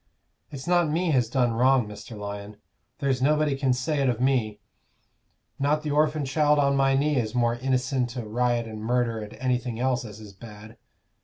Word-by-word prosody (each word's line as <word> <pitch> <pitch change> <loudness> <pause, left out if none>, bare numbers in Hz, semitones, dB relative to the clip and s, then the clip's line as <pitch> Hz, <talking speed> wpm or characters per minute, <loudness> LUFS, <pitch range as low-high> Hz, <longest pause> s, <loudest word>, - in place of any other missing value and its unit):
It's 135 -2 -8
not 175 -2 +2
me 165 +2 0
has 125 -5 +2
done 125 -2 +1
wrong, 125 0 +3
Mr. 105 +2 -10
Lyon; 100 0 -7 0.4
there's 135 -3 -1
nobody 150 +1 +2
can 135 -1 0
say 135 +4 -1
it 135 - +2
of 120 -2 -1
me 125 -5 0 1.0
not 150 +2 +1
the 150 - -2
orphan 150 0 +1
child 150 +2 +2
on 140 -1 +2
my 135 0 +3
knee 145 +1 +1
is 115 -1 -2
more 120 -1 +2
innicent 130 0 -1
o' 120 - -4
riot 120 +2 0
and 110 -1 -8
murder 115 0 0
and 105 +1 -8
anything 125 -2 -2
else 125 -1 0
as 105 -2 -10
is 105 -2 -12
bad. 105 +1 -12
125 Hz, 185 wpm, -26 LUFS, 115-140 Hz, 1.0 s, wrong